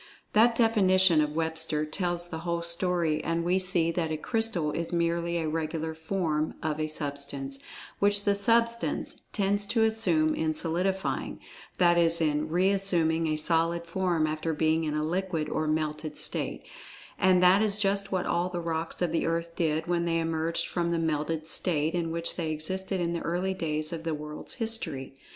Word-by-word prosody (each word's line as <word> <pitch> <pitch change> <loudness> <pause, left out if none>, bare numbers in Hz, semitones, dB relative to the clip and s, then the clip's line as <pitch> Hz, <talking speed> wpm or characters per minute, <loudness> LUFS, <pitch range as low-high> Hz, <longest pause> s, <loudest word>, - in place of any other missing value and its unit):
That 230 +2 +5
definition 190 -7 +4
of 150 0 -2
Webster 160 -1 -1
tells 175 +2 0
the 160 - -5
whole 170 0 -2
story, 170 -2 0
and 165 0 -1
we 180 +2 +2
see 180 -3 +2
that 165 -1 -2
a 155 - -1
"Crystal" 225 -5 -1
is 165 +1 -3
merely 170 0 0
a 160 -2 -1
"regular 160 0 -3
form" 160 -2 -2
of 155 -1 -2
a 155 - 0
"Substance," 140 -2 -4 0.4
which 205 0 +4
the 205 - +3
substance 230 +3 +1
"tends 205 0 +1
to 225 +1 +2
assume 175 -9 +3
in 155 -1 -1
solidifying"—that 175 0 -1
is 165 0 +5
in 155 -1 0
re 180 +4 +2
assuming 165 -5 +2
a 155 0 0
solid 165 +2 +1
form 170 -2 0
after 155 +1 -2
being 160 +1 +1
in 150 -1 -2
a 150 - 0
liquid 170 -1 -2
or 155 +1 -2
melted 155 0 -2
state, - - -2 0.6
and 185 -1 +4
that 185 +3 +6
is 210 -2 +1
just 200 -1 0
what 185 -2 0
all 175 +1 0
the 180 -1 -4
rocks 165 +1 -3
of 175 - 0
the 165 - 0
earth 165 0 -2
did 160 -1 0
when 170 -1 0
they 165 -1 +1
emerged 165 0 -1
from 170 -1 -1
the 170 - 0
melted 155 0 -1
state 160 -1 0
in 170 -2 -1
which 165 +1 -1
they 165 -3 -2
existed 185 +5 -3
in 170 -1 -1
the 170 - -3
early 180 +3 -1
days 155 -2 -2
of 165 -1 -5
the 165 -2 -2
world's 150 0 -6
history. 200 - -3
170 Hz, 180 wpm, -28 LUFS, 155-185 Hz, 0.6 s, that